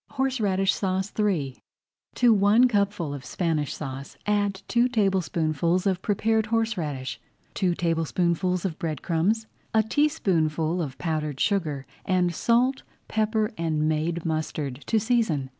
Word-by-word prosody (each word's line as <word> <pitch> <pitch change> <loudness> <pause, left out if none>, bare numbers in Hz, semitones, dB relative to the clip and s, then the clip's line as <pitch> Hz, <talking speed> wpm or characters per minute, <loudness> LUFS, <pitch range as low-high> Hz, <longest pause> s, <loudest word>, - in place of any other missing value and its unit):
HORSERADISH 215 -9 +1
SAUCE 190 +1 -2
III 165 -11 0 0.5
To 245 -2 +5
one 210 +5 +5
cupful 200 - 0
of 140 -2 -7
Spanish 160 -5 -1
Sauce 135 -2 -7
add 205 -2 0
two 240 +1 +3
tablespoonfuls 180 - +1
of 190 -2 +1
prepared 220 +1 +1
horseradish, 180 - -2 0.3
two 180 -2 +1
tablespoonfuls 170 +2 0
of 170 -5 -3
bread 155 -4 -3
crumbs, 195 +7 +1 0.3
a 220 - +5
teaspoonful 180 - +1
of 135 -5 -5
powdered 150 -2 -2
sugar, 155 -9 0 0.2
and 180 -2 +1
salt, 245 +8 +2 0.3
pepper, 220 0 0
and 155 -2 0
made 160 +2 -1
mustard 155 -4 -3
to 225 - +3
season. 215 - +1
185 Hz, 125 wpm, -26 LUFS, 155-215 Hz, 0.5 s, To